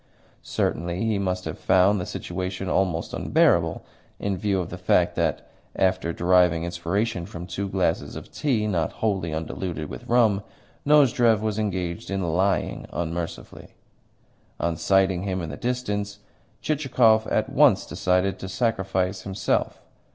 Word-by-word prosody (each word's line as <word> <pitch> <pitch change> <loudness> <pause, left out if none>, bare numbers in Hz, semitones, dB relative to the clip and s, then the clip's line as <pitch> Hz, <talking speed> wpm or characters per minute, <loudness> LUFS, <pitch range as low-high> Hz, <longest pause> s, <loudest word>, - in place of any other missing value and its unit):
Certainly 85 +5 -2
he 110 -3 +1
must 90 -2 -2
have - - -5
found 95 +1 +3
the 90 - -5
situation 90 +1 -4
almost 90 -3 0
unbearable, - - +2 0.3
in 100 -1 -2
view 100 0 0
of 90 -2 -4
the 90 - -5
fact 90 -1 +2
that, 80 -4 -1 0.3
after 95 -3 +1
deriving 90 -1 +3
inspiration 85 +2 -2
from 85 -3 -7
two 95 +2 -4
glasses 95 -4 -1
of - - -9
tea 120 -8 0
not 85 -7 -1
wholly 95 -7 -1
undiluted 80 0 -4
with - - -9
rum, 115 -4 +3 0.5
Nozdrev 125 -7 +5
was 110 -1 -1
engaged 90 -5 -3
in 95 -1 -1
lying 95 +2 0
unmercifully. 85 0 -5 0.8
On 85 0 0
sighting 95 +1 +2
him 95 -1 -2
in 80 -3 -5
the - - -5
distance, 105 -5 -2 0.5
Chichikov 125 -7 +3
at - - 0
once - - +4
decided 90 +1 0
to 95 - -6
sacrifice 95 -3 -1
himself. 95 0 -1
95 Hz, 140 wpm, -25 LUFS, 85-105 Hz, 0.8 s, Nozdrev